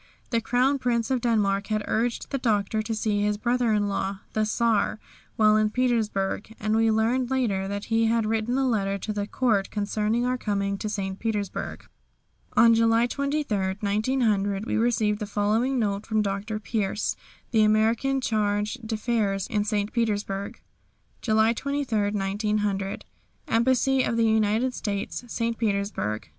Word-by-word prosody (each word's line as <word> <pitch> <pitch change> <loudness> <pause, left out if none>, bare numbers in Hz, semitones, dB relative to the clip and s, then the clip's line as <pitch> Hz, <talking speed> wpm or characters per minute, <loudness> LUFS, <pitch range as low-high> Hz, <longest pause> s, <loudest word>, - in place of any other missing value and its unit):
The 230 -1 +1
Crown 255 +5 +2
Prince 235 -1 0
of 255 -2 +1
Denmark 205 -4 +1
had 215 -1 -1
urged 235 +2 -1
the 275 - -1
Doctor 215 -2 +1
to 220 +1 -3
see 210 -1 0
his 210 0 +1
brother 240 +1 +1
in 210 -1 +2
law, 195 0 -2
the 215 0 +1
Czar, 220 -1 +1 0.4
while 215 -1 +5
in 215 0 +3
St. 210 - -7
Petersburg, 225 -4 0
and 215 +1 0
we 225 0 +3
learned 235 +3 +1
later 220 -8 0
that 200 +1 -4
he 225 0 +3
had 230 -1 +2
written 225 +3 0
a 270 -1 +2
letter 200 -4 0
to 215 +2 -4
the 205 -1 -3
Court 215 -7 +1
concerning 215 +3 -1
our 250 0 0
coming 200 -2 -1
to 215 - -3
St. 195 -2 -3
Petersburg. 210 -4 -3 0.7
On 230 0 +7
July 230 +1 +4
23, 280 -1 -1 0.2
1900, 210 -2 0
we - - -2
received 220 -2 +1
the 210 - -4
following 220 +6 +1
note 205 -3 -1
from 215 -1 +1
Dr. 205 +2 -3
Pierce, 210 -1 -1 0.4
the 225 -2 +4
American 225 +5 +2
Charge 210 0 0
d'Affaires 215 -3 -1
in 210 -3 0
St. 210 0 -1
Petersburg: 205 -4 -2 0.6
"July 220 0 +3
23, 245 -6 -1
1900. 205 -1 -1 0.4
"Embassy 260 +3 +2
of 230 - 0
the 230 - +3
United 220 +3 +2
States, 205 +1 -4
St. 230 0 -2
Petersburg. 200 - -1
215 Hz, 155 wpm, -26 LUFS, 205-235 Hz, 0.7 s, On